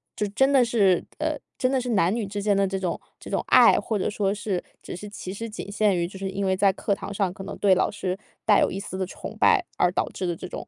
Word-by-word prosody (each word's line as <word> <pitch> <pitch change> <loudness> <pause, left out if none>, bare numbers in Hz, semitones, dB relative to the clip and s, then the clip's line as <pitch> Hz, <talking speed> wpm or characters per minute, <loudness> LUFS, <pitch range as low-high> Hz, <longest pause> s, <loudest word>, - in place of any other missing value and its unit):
就 210 - -1
真 265 +7 +3
的 270 -3 +5
是 205 -6 +3 0.2
呃， - - 0 0.2
真 255 - +1
的 265 0 +1
是 250 0 -4
男 195 -3 +2
女 230 -3 -2
之 205 +1 -4
间 205 0 +2
的 195 0 +3
这 195 0 -2
种 180 -3 -2 0.2
这 - - -10
种 - - -1
爱， - - +7
或 215 -3 -1
者 - - 0
说 200 -1 0
是 205 -3 -3 0.2
只 - - -7
是 205 +4 -8
其 190 -2 -7
实 225 +3 -5
仅 210 - -7
限 205 -1 +2
于， 170 0 0
就 190 - -10
是 190 0 -4
因 195 +1 -2
为 190 0 +2
在 195 +1 +4
课 200 +2 -1
堂 200 - -7
上， 195 -3 0
可 195 0 -9
能 - - -6
对 195 -2 +4
老 - - +1
师 190 -2 -3 0.3
带 210 -2 +5
有 - - +2
一 195 - -4
丝 195 -1 -6
的 190 - -1
崇 185 - -9
拜， 410 -6 +4
而 180 - +3
导 - - 0
致 185 - -5
的 175 -1 -1
这 - - -7
种 - - -7
200 Hz, 310 characters per minute, -25 LUFS, 190-210 Hz, 0.3 s, 爱